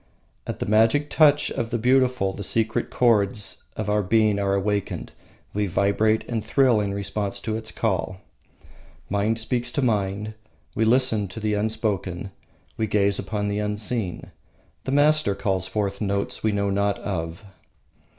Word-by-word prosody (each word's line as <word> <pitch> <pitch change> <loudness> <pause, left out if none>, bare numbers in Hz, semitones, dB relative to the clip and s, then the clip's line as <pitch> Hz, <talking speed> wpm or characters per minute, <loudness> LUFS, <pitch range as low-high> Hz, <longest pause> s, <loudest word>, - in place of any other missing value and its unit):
At - - -4
the - - -3
magic 115 +8 +3
touch 150 -2 +4
of 115 - -3
the 120 - -1
beautiful 125 -4 +2
the 100 - -6
secret 115 +4 0
chords 105 -4 +1 0.2
of 110 - -3
our 105 0 +2
being 105 +1 +2
are 100 -1 +1
awakened, 100 0 -2 0.4
we 105 0 0
vibrate 100 +4 +1
and 115 -3 -2
thrill 130 -5 +3
in 100 -1 -1
response 100 0 -3
to 110 -1 -2
its 110 0 -4
call. 95 -3 -1 0.9
Mind 105 +3 +1
speaks 120 +2 -1
to 140 - 0
mind. 105 -2 0 0.4
We 110 - +1
listen 115 -3 +2
to 95 +4 -8
the 105 -1 -1
unspoken, 100 -3 -2 0.5
we 110 - 0
gaze 100 -1 +2
upon 105 -2 -2
the 100 0 -1
unseen. 105 -1 -3 0.5
The - - -2
master 150 -5 +3
calls 95 -2 -1
forth 100 -1 -2
notes 100 -1 -2
we 110 - +1
know 100 -1 0
not 100 0 +1
of. 85 0 -4
105 Hz, 155 wpm, -24 LUFS, 100-115 Hz, 0.9 s, touch